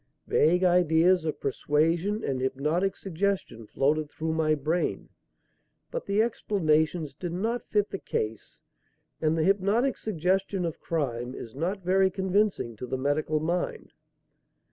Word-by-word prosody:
Vague 175 +5 +3
ideas 175 0 +4
of 155 - -2
persuasion 165 - 0
and 130 -2 -1
hypnotic 150 +9 0
suggestion 190 - -2
floated 150 +5 +1
through 160 +1 -3
my 155 -1 +2
brain; 155 +5 -1 0.8
but - - -4
the 205 +2 +3
explanations 160 -8 0
did 175 +5 -5
not 225 +7 -2
fit 210 -1 +1
the 195 - -4
case 110 0 -4 0.6
and 160 0 +2
the 160 - +2
hypnotic 200 +8 +2
suggestion 190 0 0
of 165 - -4
crime 125 -6 -2
is 115 - -8
not 180 +7 -3
very 190 +1 +4
convincing 190 - 0
to 125 - -6
the 130 - -2
medical 145 +3 0
mind. 170 +3 -2
165 Hz, 135 wpm, -27 LUFS, 150-195 Hz, 0.8 s, ideas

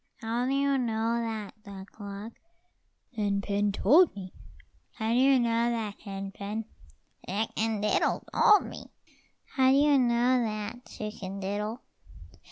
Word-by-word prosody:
"How 235 +2 -1
do - - 0
you 275 -1 +2
know 230 -1 0
that, 220 -2 -5
Duck 200 0 -12
luck?" 205 +2 -7 0.8
"Hen 205 -2 0
pen 205 +1 0
told 290 - +4
me." 185 -2 -8 0.6
"How 220 -1 -3
do 240 - +3
you 270 0 +5
know 235 0 +1
that, 220 -3 -3
Hen 195 -1 -6
pen?" 210 +3 -5 0.6
"Chicken 215 +2 -1
diddle 210 - +1
told 420 -2 +5
me." - - -9 0.6
"How 260 -1 +2
do 270 - +5
you 290 -1 +5
know 245 +1 +3
that, 215 +2 -5
Chicken 200 -2 -6
diddle?" 210 +5 -3
220 Hz, 140 wpm, -28 LUFS, 205-245 Hz, 0.8 s, you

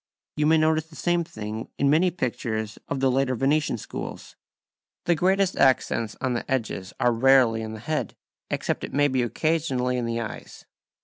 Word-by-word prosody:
You 150 0 +1
may 160 +1 +5
notice 155 0 +2
the 160 - -16
same 175 +1 +1
thing 110 -5 -6
in 140 - +2
many 170 +5 +4
pictures 115 - -3
of 140 -2 -3
the 135 -1 +3
later 130 0 +1
Venetian 145 +4 +1
schools. - - -7 0.7
The 175 - +4
greatest 190 +3 +2
accents 115 -4 +2
on 130 -1 -1
the 120 +3 -4
edges 110 -7 -2
are 120 -1 +3
rarely 120 -2 +4
in 110 0 -5
the 110 - -7
head, 155 +6 -2 0.3
except - - -2
it - - -6
may 145 0 +4
be 130 -2 0
occasionally 130 -1 0
in 120 -1 -2
the 115 0 -1
eyes. 110 -2 -7
130 Hz, 180 wpm, -25 LUFS, 115-155 Hz, 0.7 s, may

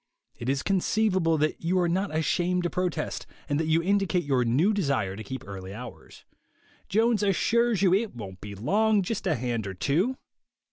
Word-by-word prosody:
It 120 - -3
is 135 0 0
conceivable 190 -3 +2
that 155 +1 0
you 175 +3 +1
are 175 - +2
not 190 +4 0
ashamed 175 +3 0
to 175 - -1
protest, 180 -4 -2 0.2
and 145 +1 0
that 160 - -1
you 160 +1 +2
indicate 195 -2 +1
your 135 -4 +1
new 145 - +2
desire 140 - 0
to 110 - -7
keep 130 +4 -6
early 95 0 -7
hours. 120 +1 -11 0.6
Jones 225 +1 +2
assures 215 +3 +2
you 185 -2 +5
it 205 - 0
won't 95 -5 -8
be 100 -1 -7
long; 205 - +2
just 210 +1 -3
a 160 - +2
hand 120 -4 -2
or 95 - -5
two. 175 - 0
170 Hz, 185 wpm, -27 LUFS, 125-200 Hz, 0.6 s, you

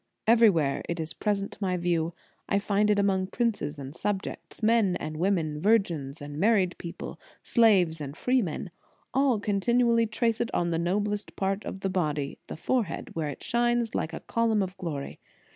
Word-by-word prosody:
Everywhere 205 -11 +4
it 170 0 -2
is 160 0 -3
present 200 -2 -1
to - - -10
my 185 -2 0
view. 170 -1 0 0.3
I 200 - +3
find 205 +1 +1
it 210 - +4
among 195 -2 +2
princes 205 -9 -1
and 140 +1 -8
subjects, 205 +3 -4
men 215 -4 +4
and 155 -3 -4
women, 165 -4 0
virgins 165 -9 +1
and 145 +1 -6
married 195 -3 +3
people, 170 - -7 0.2
slaves 185 -9 +4
and 145 +1 -6
freemen. 215 -8 0 0.4
All 265 -3 +3
continually 230 +3 +2
trace 225 +1 0
it 235 - -1
on 170 0 +1
the 165 - 0
noblest 205 +4 -1
part 195 +1 -1
of 190 - -6
the 195 - 0
body, 150 -6 -1
the - - -7
forehead, 230 +2 -1
where 155 -2 -2
it 140 - -8
shines 240 -1 +1
like 160 - -1
a - - -6
column 225 -3 +1
of 185 0 -5
glory. 155 -7 -5
195 Hz, 175 wpm, -28 LUFS, 165-220 Hz, 0.4 s, Everywhere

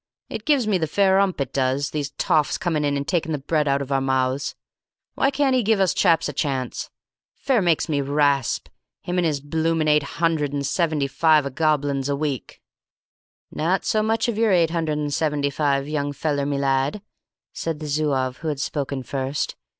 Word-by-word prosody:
It - - -6
gives 290 -6 +3
me 205 -4 +1
the 160 - 0
fair 195 +3 +3
'ump, 195 -4 +1
it 135 -1 -3
does, 135 +2 0
these 145 -2 -2
toffs 150 +1 +1
coming 170 -6 -1
in 145 -1 +1
and 140 - -4
taking 165 -3 0
the - - 0
bread 150 +2 0
out 140 0 +1
of 140 - -9
our 135 0 +2
mouths. 130 0 0 0.6
Why 270 - +2
can't 275 -1 +1
he 255 - +3
give 220 -1 +2
us 190 -2 +3
chaps 170 -4 +3
a 145 - -5
chance? 135 -3 -2 0.5
Fair 260 -6 +1
makes 170 -3 +2
me 145 -3 0
rasp, 140 -2 +1 0.4
him 180 +1 -1
and 175 - +2
his 150 -3 -1
bloomin' 160 +2 0
eight 150 0 +4 0.2
hundred 160 -4 +1
and 140 -1 -2
seventy 155 -2 0
five 150 +2 +3
o' 140 - -3
goblins 145 -2 0
a 140 - +1
week." 140 -3 -4 0.9
"Not 180 +5 0
so 215 - +2
much 225 +2 +1
of 225 -2 -2
your 225 -2 +3
eight 170 -3 +3
hundred 160 -3 -1
and 145 -1 -2
seventy 145 -2 0
five, 140 -1 0
young 145 -1 -2
feller 145 -1 -1
me 145 -1 -1
lad," 140 +7 0 0.5
said 165 -2 -3
the 155 - -6
Zouave 140 -4 0
who 165 - -6
had 150 -3 -2
spoken 140 -2 -3
first. 135 +2 -3
150 Hz, 200 wpm, -23 LUFS, 140-170 Hz, 0.9 s, eight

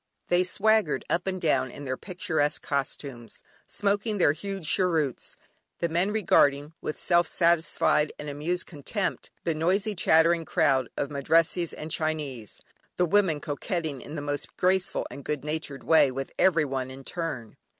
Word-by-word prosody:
They 175 +1 +4
swaggered 220 +4 +2
up 175 +2 0
and 185 -1 -1
down 155 -6 +1
in 145 - -9
their 130 -2 -2
picturesque 160 -4 -1
costumes, 135 -4 -4 0.2
smoking 205 +1 -1
their 170 -6 +4
huge 195 +1 -5
cheroots, 160 -9 0 0.4
the 170 - -1
men 175 +4 +1
regarding 150 -8 +3
with 155 - -4
self 175 -1 +2
satisfied 165 -3 +2
and 150 - -7
amused 155 +5 -2
contempt 185 +6 -3
the 165 - 0
noisy 190 +7 +1
chattering 165 -2 +4
crowd 135 -5 +2
of 145 - -2
Madrassees 165 +4 +2
and 155 +1 -6
Chinese, 150 -9 -2 0.4
the 180 - +3
women 180 -4 +3
coquetting 150 0 -3
in 150 - -8
the 145 - -4
most 145 -1 -4
graceful 185 +1 +1
and 140 - -9
goodnatured 150 0 -3
way 160 -4 +5
with 135 +1 -5
everyone 140 -8 +2
in 135 +1 -10
turn. 140 -9 -4
160 Hz, 150 wpm, -27 LUFS, 145-180 Hz, 0.4 s, way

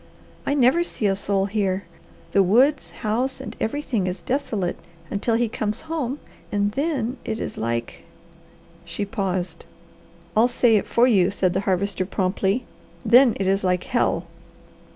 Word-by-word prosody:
I 285 - +2
never 270 +5 +4
see 240 - -4
a 195 -1 +3
soul 195 0 0
here; 200 -2 -1 0.5
the 195 - +4
woods, 255 +10 +3 0.2
house, 250 +6 0
and 265 - -7
everything 225 -5 -1
is 180 +1 -4
desolate 215 -9 -2 0.3
until 225 +3 0
he 235 +1 +2
comes 215 -1 -3
home 300 -4 -3 0.3
and 205 0 +1
then 270 -2 -1
it 220 0 -3
is - - -4
like 115 +1 -3 0.4
" - - -27
she 205 - -2
paused. 190 -3 -3 0.7
"I'll 225 +3 +5
say 240 -2 +3
it - - -2
for 235 - +4
you," 195 -7 +4
said 190 -2 0
the 190 - +1
Harvester 190 0 0
promptly. 195 +4 0 0.4
"Then 240 +2 +6
it 195 - 0
is 195 +1 +1
like 180 -1 +1
hell." 240 - 0
210 Hz, 155 wpm, -23 LUFS, 190-250 Hz, 0.7 s, Then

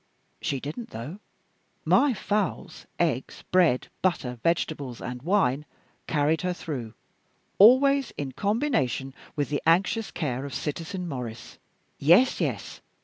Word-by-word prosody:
She 135 - -1
didn't 155 - -6
though. 125 - -7 0.7
My 280 -4 +4
fowls, 205 0 -2
eggs, 140 -7 -1
bread, 175 -9 +3
butter, 130 -10 -1
vegetables, 145 -5 -1
and 125 0 -6
wine 150 -5 +2 0.4
carried 150 +1 +1
her 180 0 -1
through 125 -10 -6 0.6
always 265 +5 +6
in 140 -2 -3
combination 200 - 0 0.2
with 145 -1 -1
the 145 - -1
anxious 190 +6 +3
care 130 -5 -3
of 140 -4 -6
Citizen 165 +6 -4
Maurice. 125 -6 -7 0.4
Yes, 175 - +5
yes! - - -3
160 Hz, 120 wpm, -26 LUFS, 130-195 Hz, 0.7 s, always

